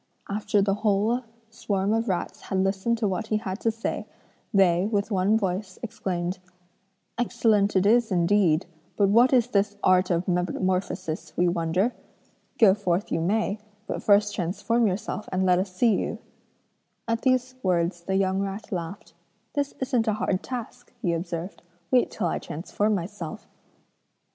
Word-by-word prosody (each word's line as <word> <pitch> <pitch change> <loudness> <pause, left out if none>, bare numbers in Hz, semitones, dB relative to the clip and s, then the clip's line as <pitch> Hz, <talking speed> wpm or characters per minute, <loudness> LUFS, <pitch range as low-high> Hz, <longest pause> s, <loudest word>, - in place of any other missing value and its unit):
After 205 0 +1
the 195 0 +2
whole 215 +3 +2 0.3
swarm 200 -2 -1
of 225 0 0
rats 180 - -2
had 190 - -3
listened 195 +4 0
to 220 -2 0
what 200 +3 -2
he 215 - +1
had 195 -2 -4
to 230 - +1
say, 225 +1 -3 0.4
they, 190 -3 +4
with 210 0 -1
one 200 +3 +3
voice, 190 -1 -3
exclaimed: 185 -4 -3 0.8
'Excellent 220 -4 +2
it 190 0 +3
is 230 +1 +4
indeed, 175 -2 +3 0.3
but 200 -2 +4
what 235 +5 +5
is 250 -4 +4
this 205 -2 +1
art 185 0 +4
of 175 0 0
metamorphosis 180 -2 -1
we 180 - +3
wonder? 175 +6 +1 0.6
Go 205 -4 +7
forth 190 -2 -1
you 165 - 0
may, 205 +3 0 0.3
but - - -4
first 205 0 +4
transform 215 +6 0
yourself 210 +2 -3
and 185 0 +1
let 180 -1 +4
us 190 0 -2
see 220 +5 +3
you.' - - -2 0.9
At 230 0 0
these 255 -1 +1
words 175 -1 0
the 190 +3 -2
young 190 0 +1
rat 200 +2 -5
laughed. 170 -1 -5 0.4
'This 285 -1 -1
isn't 250 -3 +1
a 215 - +3
hard 200 -2 -1
task!' 245 0 -7
he 175 -4 +1
observed, 170 +2 -4 0.3
'wait 250 -1 +4
till 205 - -3
I 170 - 0
transform 205 +6 -1
myself.' 175 -3 -6
200 Hz, 160 wpm, -26 LUFS, 185-220 Hz, 0.9 s, Go